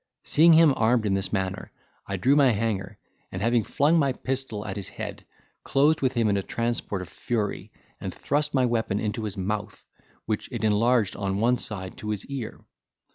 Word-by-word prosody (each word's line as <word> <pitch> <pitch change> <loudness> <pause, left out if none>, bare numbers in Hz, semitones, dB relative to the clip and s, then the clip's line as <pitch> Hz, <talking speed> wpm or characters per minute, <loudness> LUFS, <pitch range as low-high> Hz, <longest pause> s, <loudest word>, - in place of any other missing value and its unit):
Seeing 165 +2 +5
him 160 -3 +6
armed 115 0 +2
in 100 - +1
this 95 0 -1
manner, 95 -2 -3 0.4
I 100 - -2
drew 130 +10 +3
my 140 -3 +5
hanger, 105 -3 -2 0.3
and, 95 - -4
having 115 +2 +2
flung 150 +10 +2
my 140 -3 +2
pistol 130 -5 -3
at 95 -2 -4
his 100 -3 -6
head, - - -7 0.4
closed 150 +3 +3
with 130 -1 +1
him 115 -2 +2
in 100 -1 +2
a - - 0
transport 115 -3 -2
of - - -10
fury, 105 0 -3 0.3
and - - -4
thrust 150 +1 -1
my 130 -1 +4
weapon 115 -4 0
into 110 +1 -2
his 100 -2 -4
mouth, 100 +1 -4 0.4
which - - -3
it - - -4
enlarged 110 0 +2
on 100 -1 -2
one 120 +3 +3
side 100 -7 -3
to 105 - -6
his 105 -2 -3
ear. 135 -5 -6
110 Hz, 190 wpm, -26 LUFS, 100-130 Hz, 0.4 s, him